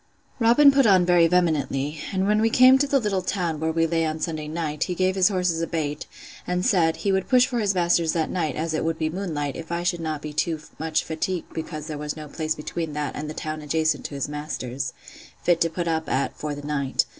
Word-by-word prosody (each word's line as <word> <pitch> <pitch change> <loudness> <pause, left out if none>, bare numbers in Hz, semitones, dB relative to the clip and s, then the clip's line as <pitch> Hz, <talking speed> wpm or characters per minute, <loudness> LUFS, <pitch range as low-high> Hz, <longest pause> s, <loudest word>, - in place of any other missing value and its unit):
Robin 240 +5 +6
put 275 -3 +4
on 185 -3 +5
very 175 -1 +5
vehemently; 150 -4 0
and 190 0 0
when 210 +1 +2
we 225 - +3
came 255 +3 +7
to 280 +2 +2
the 275 - +3
little 205 -5 -1
town, 175 -5 -2
where 160 +1 0
we 165 0 +2
lay 165 0 0
on 160 0 -2
Sunday 155 -2 -3
night, 155 -1 -2
he 180 - -3
gave 185 +1 +1
his 185 -1 +4
horses 180 -4 0
a 165 - -1
bait, 150 -3 -3 0.4
and 180 0 -1
said, 165 -4 +3
he 200 - -1
would 190 -1 0
push 250 -1 +6
for 245 -2 -2
his 200 -3 +1
master's 170 -2 +2
that 160 -2 -1
night, 160 -7 -1
as 160 +1 -2
it 155 - -1
would 165 0 -1
be 155 -1 -1
moon 180 -2 -4
light, 145 -1 -2
if 165 0 -8
I 170 0 -1
should 175 -1 0
not 155 -2 -4
be 150 -1 -6
too 160 +1 0 0.2
much 160 0 0
fatigued 165 +3 -3
because 155 -1 -5
there 155 -2 -5
was 150 +1 -4
no 155 -1 -7
place 155 +1 -2
between 160 0 -4
that 150 0 -3
and 150 0 -5
the 155 - -6
town 155 0 -4
adjacent 155 +1 0
to 145 - -5
his 140 - -2
master's, 140 -4 -4 0.5
fit 175 -1 +2
to 165 - +3
put 170 +1 -3
up 160 -1 -1
at, 135 - 0
for 150 -1 -4
the 145 0 -8
night. 140 -3 0
165 Hz, 250 wpm, -24 LUFS, 155-180 Hz, 0.5 s, came